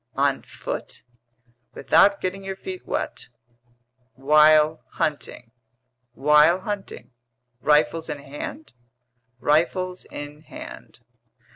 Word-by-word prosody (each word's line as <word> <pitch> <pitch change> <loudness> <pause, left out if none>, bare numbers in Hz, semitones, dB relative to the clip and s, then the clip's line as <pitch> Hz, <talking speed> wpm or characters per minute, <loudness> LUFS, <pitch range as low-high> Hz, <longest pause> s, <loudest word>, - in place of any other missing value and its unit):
"On - - +1
foot?" - - -7 0.7
"Without 200 0 +4
getting 190 +1 -3
your 195 0 -5
feet 370 - -8
wet." - - -4 0.9
"While 150 +3 +5
hunting?" 135 -5 -3 0.6
"While 150 +6 +4
hunting." 205 -6 -6 0.5
"Rifles 150 +3 +2
in - - -3
hand?" 145 - -8 0.7
"Rifles 180 +5 0
in 145 +1 -9
hand." 155 - -11
155 Hz, 90 wpm, -24 LUFS, 150-190 Hz, 0.9 s, While